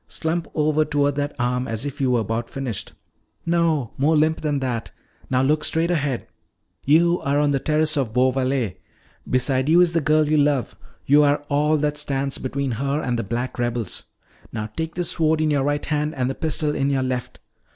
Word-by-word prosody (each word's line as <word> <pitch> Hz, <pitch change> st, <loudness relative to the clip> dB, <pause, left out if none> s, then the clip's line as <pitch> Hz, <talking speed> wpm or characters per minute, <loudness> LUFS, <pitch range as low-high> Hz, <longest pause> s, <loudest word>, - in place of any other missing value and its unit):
Slump 165 Hz, +1 st, -2 dB
over 155 Hz, 0 st, +2 dB
toward 145 Hz, -1 st, +1 dB
that 145 Hz, 0 st, -2 dB
arm 125 Hz, +1 st, -1 dB
as 115 Hz, +3 st, -2 dB
if 145 Hz, 0 st, -5 dB
you 130 Hz, -, +2 dB
were 120 Hz, -2 st, +2 dB
about 115 Hz, +2 st, -3 dB
finished. 130 Hz, -6 st, -4 dB, 0.5 s
No, 165 Hz, -7 st, +1 dB
more 155 Hz, +4 st, +3 dB
limp 155 Hz, +1 st, +2 dB
than 150 Hz, -2 st, 0 dB
that. 125 Hz, -4 st, -3 dB, 0.4 s
Now 130 Hz, 0 st, +2 dB
look 150 Hz, +3 st, +2 dB
straight 165 Hz, +2 st, 0 dB
ahead. 145 Hz, -7 st, -1 dB, 0.6 s
You 170 Hz, +4 st, +3 dB
are 140 Hz, +1 st, 0 dB
on 145 Hz, 0 st, +2 dB
the 135 Hz, -, +1 dB
terrace 155 Hz, +2 st, +1 dB
of 130 Hz, -6 st, 0 dB
Beauvallet. 130 Hz, -4 st, +1 dB, 0.5 s
Beside 130 Hz, +2 st, +1 dB
you 170 Hz, +2 st, +6 dB
is 175 Hz, -1 st, +4 dB
the 165 Hz, -, +2 dB
girl 155 Hz, +1 st, +3 dB
you 155 Hz, +1 st, +2 dB
love. 145 Hz, -5 st, +1 dB, 0.3 s
You 145 Hz, +2 st, +5 dB
are 145 Hz, 0 st, +2 dB
all 150 Hz, +2 st, +2 dB
that 150 Hz, 0 st, -1 dB
stands 140 Hz, -2 st, -2 dB
between 135 Hz, 0 st, -2 dB
her 140 Hz, +5 st, -1 dB
and 125 Hz, -5 st, -1 dB
the -, -, -1 dB
black 120 Hz, +5 st, -4 dB
rebels. 120 Hz, -3 st, -2 dB, 0.5 s
Now 110 Hz, -1 st, -5 dB
take 160 Hz, 0 st, -4 dB
this 175 Hz, -1 st, -1 dB
sword 160 Hz, -1 st, +1 dB
in 155 Hz, -1 st, +1 dB
your 140 Hz, -2 st, +2 dB
right 145 Hz, 0 st, -1 dB
hand 150 Hz, +1 st, -1 dB
and 130 Hz, 0 st, 0 dB
the -, -, -3 dB
pistol 155 Hz, -1 st, -1 dB
in 140 Hz, -1 st, 0 dB
your 135 Hz, -2 st, +1 dB
left. 130 Hz, -1 st, -4 dB
145 Hz, 200 wpm, -22 LUFS, 130-155 Hz, 0.6 s, you